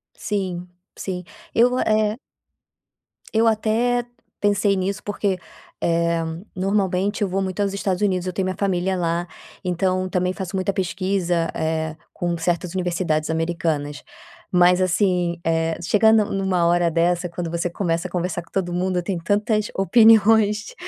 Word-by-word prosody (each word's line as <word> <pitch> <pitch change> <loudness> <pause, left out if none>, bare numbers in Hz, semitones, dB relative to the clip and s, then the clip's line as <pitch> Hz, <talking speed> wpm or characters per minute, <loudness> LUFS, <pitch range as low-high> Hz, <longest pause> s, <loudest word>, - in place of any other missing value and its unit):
Sim, 185 -4 -3 0.3
sim. 180 -2 -5 0.3
Eu 240 +2 +5
go 250 +1 -1
é 215 0 +1 1.2
eu 225 +1 +3
até 230 +2 +1 0.3
pensei 205 -1 +2
nisso, 195 +2 -2
porque, 205 -2 -1 0.4
eh, 170 0 +1 0.3
normalmente 195 +1 0
eu - - +1
vou 190 +1 -1
muito 190 +1 -2
aos 200 -1 0
Estados 195 -2 -1
Unidos, 185 -3 +1
eu 185 - -3
tenho 190 - -1
minha 185 0 -2
família 190 -1 0
lá, 170 0 -1 0.4
então 185 +1 0
também 180 0 0
faço 185 +1 -5
muita 190 +1 0
pesquisa, 185 -2 0
eh, 160 0 -1 0.2
com 175 -1 -2
certas 170 +1 -1
universidades 175 -4 -1
americanas. 160 -3 -2 0.5
Mas 180 0 +5
assim, 180 -2 +1
eh, 165 0 0
chegando 215 +4 +4
numa 190 -3 0
hora 175 0 +3
dessa, 175 +2 +1
quando 170 0 -5
você 170 +1 -1
começa 170 -1 -1
a - - -16
conversar 180 0 -2
com - - -25
todo 180 -2 -1
mundo, 180 0 0
tem 185 +1 -3
tantas 210 +4 0
opiniões 220 - +4
185 Hz, 145 wpm, -22 LUFS, 175-200 Hz, 1.2 s, Eu